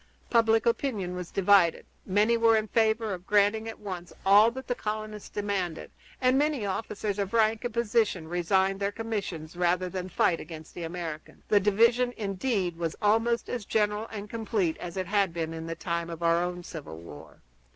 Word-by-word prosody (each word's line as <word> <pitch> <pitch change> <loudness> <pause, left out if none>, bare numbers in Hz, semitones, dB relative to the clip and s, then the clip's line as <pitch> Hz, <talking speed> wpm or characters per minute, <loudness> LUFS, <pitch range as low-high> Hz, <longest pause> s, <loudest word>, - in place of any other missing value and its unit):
Public 225 -1 +4
opinion 230 -7 0
was 180 -1 -6
divided; 195 -3 +3 0.2
many 210 +4 +3
were 230 -1 +4
in 215 0 -1
favor 220 -1 +1
of 180 0 -8
granting 210 +2 +3
at 225 - -8
once 180 -4 -7
all 205 +3 +7
that 260 +2 -8
the 245 - -1
colonists 215 -2 -5
demanded, 195 -5 -3 0.3
and 255 +1 +3
many 295 -7 0
officers 205 0 -3
of 200 0 -2
rank 220 0 +3
and 245 - -2
position 220 -7 +1
resigned 190 +3 +1
their 200 0 0
commissions 195 -8 -4
rather 180 +1 +1
than 185 0 -5
fight 170 -1 +2
against 160 -1 -10
the - - -7
Americans. 165 -2 -7
The 205 - +5
division, 230 +5 +3
indeed, 195 -3 -1
was 165 -2 -2
almost 225 +3 +2
as 240 -3 -3
general 210 +1 0
and 210 -1 -6
complete 215 -6 -1
as 175 +1 -7
it 185 - -1
had 195 -2 +1
been 165 -1 -2
in 165 0 -6
the 165 - -4
time 170 0 -3
of 170 0 -6
our 170 0 +3
own 180 0 -4
civil 155 - -8
war. 80 -3 -12
200 Hz, 180 wpm, -28 LUFS, 175-225 Hz, 0.3 s, all